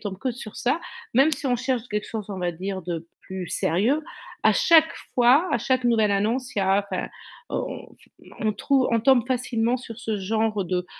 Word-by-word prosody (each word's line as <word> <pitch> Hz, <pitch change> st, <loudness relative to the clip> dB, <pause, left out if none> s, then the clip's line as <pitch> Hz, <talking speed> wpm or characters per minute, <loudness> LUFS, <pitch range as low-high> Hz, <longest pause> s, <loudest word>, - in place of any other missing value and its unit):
tombent 195 Hz, -3 st, -5 dB
que 255 Hz, 0 st, -2 dB
sur 225 Hz, -3 st, -9 dB
ça, 270 Hz, +7 st, 0 dB, 0.3 s
même 270 Hz, +5 st, +5 dB
si 280 Hz, -, -2 dB
on 250 Hz, -, +2 dB
cherche 255 Hz, -1 st, -1 dB
quelque 210 Hz, 0 st, -3 dB
chose, 215 Hz, -3 st, -5 dB
on 195 Hz, -, -5 dB
va 175 Hz, -1 st, -1 dB
dire 185 Hz, +2 st, -5 dB
de 170 Hz, -1 st, -5 dB
plus 190 Hz, -2 st, -7 dB
sérieux, 225 Hz, -, +1 dB, 0.4 s
à -, -, +6 dB
chaque 320 Hz, -2 st, +5 dB, 0.2 s
fois, 260 Hz, +8 st, +5 dB
à 240 Hz, -, +2 dB
chaque 255 Hz, +2 st, 0 dB
nouvelle 220 Hz, -4 st, +3 dB
annonce, 240 Hz, +7 st, -1 dB
il -, -, +1 dB
y -, -, +1 dB
a, 190 Hz, +1 st, +3 dB
enfin, -, -, -2 dB, 0.4 s
on -, -, -4 dB, 0.5 s
on 215 Hz, -2 st, +1 dB
trouve 270 Hz, +4 st, +1 dB
on 230 Hz, -, +2 dB
tombe 250 Hz, 0 st, +4 dB
facilement 245 Hz, -1 st, 0 dB
sur 230 Hz, -2 st, -9 dB
ce 225 Hz, -2 st, -2 dB
genre 210 Hz, +1 st, 0 dB
de, 180 Hz, 0 st, -2 dB
225 Hz, 200 wpm, -24 LUFS, 195-255 Hz, 0.5 s, à